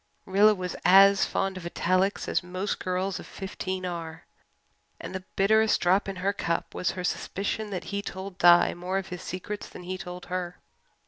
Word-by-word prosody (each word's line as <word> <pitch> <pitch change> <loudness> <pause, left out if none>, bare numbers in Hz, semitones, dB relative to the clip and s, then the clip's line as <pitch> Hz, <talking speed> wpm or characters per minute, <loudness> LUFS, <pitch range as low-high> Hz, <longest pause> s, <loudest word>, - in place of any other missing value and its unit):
Rilla 205 +3 +5
was 180 -1 -4
as 195 +2 +7
fond 195 -1 -1
of 180 - -8
italics 185 +3 0
as - - +1
most 185 +3 -3
girls 185 0 -2
of - - -10
fifteen 190 -1 -5
are 165 -2 -6 0.7
and - - -7
the 190 -1 -5
bitterest 220 +3 +4
drop 190 +3 +2
in 195 - -4
her 190 +2 0
cup 170 -3 -2
was 180 - -1
her 180 - -3
suspicion 205 +4 -2
that 185 -3 -4
he 200 - 0
told 190 -1 -7
Di 175 -1 +6
more 180 +2 -3
of 195 - -4
his 180 -2 -6
secrets 200 +3 -6
than - - -10
he 185 +1 -5
told 180 -1 -7
her. 180 -1 -4
185 Hz, 185 wpm, -27 LUFS, 180-195 Hz, 0.7 s, as